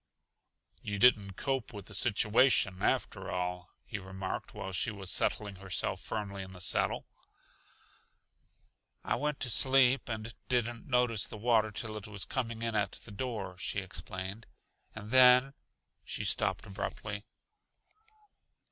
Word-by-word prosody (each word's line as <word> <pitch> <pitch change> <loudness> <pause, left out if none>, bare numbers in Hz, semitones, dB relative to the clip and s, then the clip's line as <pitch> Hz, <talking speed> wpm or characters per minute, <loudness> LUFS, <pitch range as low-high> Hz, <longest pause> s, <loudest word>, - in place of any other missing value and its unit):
"You 100 0 -4
didn't 105 -4 +4
'cope 135 +3 -2
with 100 -3 -8
the 105 - -9
situation,' 105 -2 +3
after - - 0
all," 90 -1 -3 0.2
he 105 - -5
remarked 95 0 -5
while 95 - -6
she 95 +5 -1
was 100 -4 -3
settling 100 -3 0
herself 95 -1 -2
firmly 100 -2 -4
in 95 0 -9
the 90 - -11
saddle. 90 - +1 2.0
"I - - -1
went 150 -1 -2
to 125 - +1
sleep 130 +1 +5
and 110 0 -4 0.2
didn't 120 -2 -1
notice 125 -4 +3
the - - -8
water 110 -1 +3
till 110 +1 -5
it 105 - -7
was 100 -3 -5
coming 115 -3 -3
in 115 -1 -1
at 105 -1 0
the 110 - -10
door," 100 -5 -5
she 95 - -2
explained. 95 +3 -5 0.5
"And 110 0 -8
then 130 +1 +7 0.3
" - - -53
She - - -4
stopped 95 +4 0
abruptly. 105 +1 -5
105 Hz, 140 wpm, -32 LUFS, 95-120 Hz, 2.0 s, then